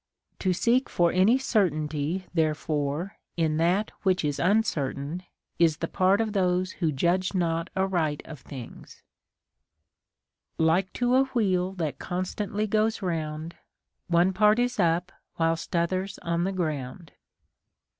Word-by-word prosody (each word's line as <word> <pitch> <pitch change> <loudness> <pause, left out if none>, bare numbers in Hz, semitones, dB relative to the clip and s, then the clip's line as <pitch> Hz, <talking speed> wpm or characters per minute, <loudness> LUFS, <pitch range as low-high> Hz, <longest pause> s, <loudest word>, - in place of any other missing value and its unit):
To 185 - +1
seek 235 +8 +2
for 170 -1 +2
any 195 +7 +4
certainty 165 - 0
therefore 155 +1 -1 0.2
in 160 -2 +1
that 180 +6 +1
which 185 -4 +1
is 145 -1 -1
uncertain 170 -6 0 0.4
is 165 -3 +4
the 165 - -3
part 190 +3 +2
of 220 -2 -1
those 185 -1 +1
who 165 -4 -1
judge 175 +7 0
not 165 -1 0
aright 175 -6 0
of 155 -3 -9
things: 130 -2 -11 0.8
— - - -54 0.6
Like 165 +4 +2
to 245 0 +1
a 265 +1 +5
wheel 190 -8 0
that 155 -7 -3
constantly 200 +3 -2
goes 215 +1 0
round, 160 -2 -3 0.5
One 175 +2 +3
part 210 +3 +4
is 245 -2 0
up 175 0 +2 0.3
whilst 165 0 0
t'other's 185 +3 -1
on 170 0 0
the 195 - 0
ground. 155 -2 -4
180 Hz, 135 wpm, -27 LUFS, 160-195 Hz, 0.8 s, a